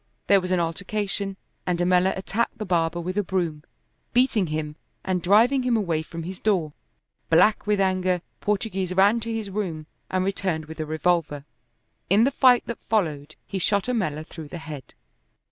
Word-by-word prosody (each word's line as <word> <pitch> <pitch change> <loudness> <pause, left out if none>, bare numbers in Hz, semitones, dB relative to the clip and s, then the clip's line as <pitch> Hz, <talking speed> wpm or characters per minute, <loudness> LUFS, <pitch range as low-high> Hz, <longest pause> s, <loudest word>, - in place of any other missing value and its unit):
There 200 -1 +5
was 180 - -4
an 185 -1 +2
altercation, 195 +3 -2 0.3
and 180 -1 +1
Ammella 180 +2 +2
attacked 200 +4 -2
the 215 - -4
barber 170 -2 +1
with 185 +4 -2
a - - +1
broom, 170 -5 -2 0.5
beating 240 -6 +3
him 155 -1 -3 0.3
and 185 -1 0
driving 225 +9 +4
him 250 -2 +2
away 170 -7 0
from 165 +1 -7
his 185 +2 -7
door. 180 -8 0 0.6
Black 180 +7 +4
with 210 -1 +2
anger, 185 -2 +1 0.2
Portoghese 195 -3 -1
ran 205 +4 +5
to 230 0 -4
his 220 -3 -3
room 180 -7 -3 0.2
and 185 0 0
returned 185 -5 -1
with 160 +1 -10
a 155 - -3
revolver. 155 -2 0 0.6
In 200 +5 +5
the 270 - +3
fight 255 -2 +5
that 235 - -6
followed 155 -8 0
he 195 - -4
shot 200 +2 +2
Ammella 155 -12 -1
through 160 -2 -9
the 175 - -7
head. 155 -4 -9
185 Hz, 175 wpm, -25 LUFS, 165-210 Hz, 0.6 s, There